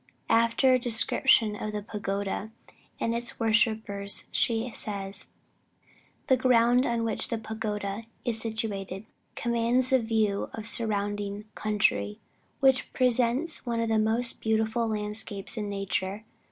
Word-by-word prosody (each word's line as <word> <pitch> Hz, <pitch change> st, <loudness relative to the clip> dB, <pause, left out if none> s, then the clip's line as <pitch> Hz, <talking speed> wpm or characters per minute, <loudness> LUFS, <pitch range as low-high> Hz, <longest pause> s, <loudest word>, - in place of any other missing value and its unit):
After 230 Hz, +3 st, +4 dB
a 255 Hz, -, +4 dB
description 225 Hz, -2 st, +3 dB
of 210 Hz, 0 st, -5 dB
the 210 Hz, -1 st, -3 dB
pagoda 200 Hz, 0 st, -3 dB, 0.5 s
and 230 Hz, -, 0 dB
its 235 Hz, +1 st, -4 dB
worshippers, 220 Hz, -3 st, +1 dB
she 230 Hz, +1 st, 0 dB
says: 200 Hz, -2 st, -4 dB, 1.0 s
"The 260 Hz, -, +4 dB
ground 245 Hz, 0 st, +4 dB
on 235 Hz, -1 st, 0 dB
which 225 Hz, -, 0 dB
the 230 Hz, -, -2 dB
pagoda 215 Hz, -1 st, -4 dB, 0.2 s
is 230 Hz, -2 st, 0 dB
situated, 215 Hz, -3 st, -4 dB, 0.3 s
commands 240 Hz, +2 st, +2 dB
a 260 Hz, -, +6 dB
view 220 Hz, -3 st, 0 dB
of 220 Hz, -, -6 dB
the -, -, -3 dB
surrounding 205 Hz, -2 st, -1 dB
country, 150 Hz, -, 0 dB, 0.4 s
which 265 Hz, -1 st, +3 dB
presents 255 Hz, +5 st, +2 dB
one 235 Hz, -2 st, -2 dB
of 230 Hz, -1 st, 0 dB
the 220 Hz, -1 st, +3 dB
most 225 Hz, +3 st, +1 dB
beautiful 220 Hz, +1 st, +1 dB
landscapes 210 Hz, -1 st, -3 dB
in 210 Hz, -2 st, -3 dB
nature. 195 Hz, +1 st, -2 dB
220 Hz, 130 wpm, -28 LUFS, 205-235 Hz, 1.0 s, a